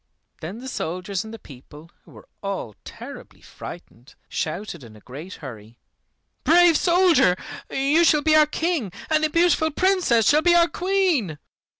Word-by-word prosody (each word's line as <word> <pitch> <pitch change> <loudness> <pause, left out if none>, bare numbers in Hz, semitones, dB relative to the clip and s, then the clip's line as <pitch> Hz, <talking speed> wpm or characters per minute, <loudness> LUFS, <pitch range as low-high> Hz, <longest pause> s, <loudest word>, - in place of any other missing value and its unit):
Then 175 +7 -7
the 255 +2 -9
soldiers 185 -3 -4
and 220 - -10
the 225 - -8
people, 150 - -15
who - - -18
were - - -15
all 195 - -5
terribly - - -11
frightened, 120 +4 -12
shouted 165 -1 -5
in 110 -2 -14
a - - -15
great 145 - -10
hurry, 115 -5 -11 0.7
"Brave 345 0 +5
soldier, 345 - +4 0.3
you 280 +5 +2
shall 300 -3 +3
be 310 +1 +4
our 305 -1 +6
King, 320 - -2 0.2
and 310 0 +2
the 310 - +2
beautiful 335 -1 +2
Princess 350 - +2
shall 300 +1 +4
be 345 +1 +4
our 340 0 +5
Queen!" 355 - 0
260 Hz, 160 wpm, -23 LUFS, -, 0.7 s, our